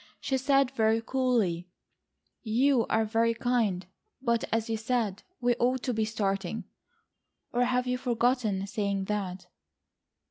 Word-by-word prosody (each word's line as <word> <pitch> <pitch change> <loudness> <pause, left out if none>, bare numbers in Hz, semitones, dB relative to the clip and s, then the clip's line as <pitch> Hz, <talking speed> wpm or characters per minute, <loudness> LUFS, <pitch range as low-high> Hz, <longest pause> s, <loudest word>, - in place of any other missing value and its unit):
She 265 - -1
said 275 -1 +3
very 225 -3 +2
coolly: 225 -9 0 0.7
"You 245 +2 +2
are 220 0 +2
very 230 +1 +2
kind, 225 -7 0 0.3
but 235 -3 +1
as 225 0 0
you 225 - -1
said, 220 -3 -1 0.2
we 245 0 +3
ought 255 +1 +1
to 250 - 0
be 220 -1 +1
starting,—or 220 - -4
have 250 0 +1
you 250 0 -1
forgotten 240 -5 +1
saying 200 -1 -1
that?" 190 -3 -3
230 Hz, 130 wpm, -29 LUFS, 210-250 Hz, 0.7 s, said